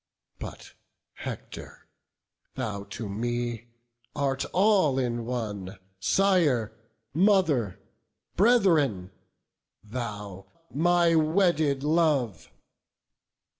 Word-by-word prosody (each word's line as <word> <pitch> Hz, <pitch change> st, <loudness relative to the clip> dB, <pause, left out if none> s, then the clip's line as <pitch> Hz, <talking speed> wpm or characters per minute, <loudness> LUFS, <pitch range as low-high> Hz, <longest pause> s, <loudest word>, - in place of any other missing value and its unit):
But, -, -, -9 dB, 0.4 s
Hector, -, -, -8 dB, 0.7 s
thou 105 Hz, -6 st, -4 dB
to 110 Hz, -, -6 dB
me 120 Hz, +2 st, -3 dB, 0.5 s
art 135 Hz, -2 st, -1 dB
all 185 Hz, -8 st, +3 dB
in 120 Hz, -3 st, -1 dB
one, 105 Hz, -6 st, -4 dB, 0.2 s
Sire, 145 Hz, -, +2 dB, 0.4 s
mother, 160 Hz, -, +2 dB, 0.6 s
brethren! 160 Hz, -, +3 dB, 0.7 s
thou, 105 Hz, -4 st, -6 dB, 0.3 s
my 170 Hz, +2 st, +3 dB
wedded 155 Hz, -4 st, +2 dB
love! 150 Hz, -, +1 dB
135 Hz, 70 wpm, -27 LUFS, 110-170 Hz, 0.7 s, all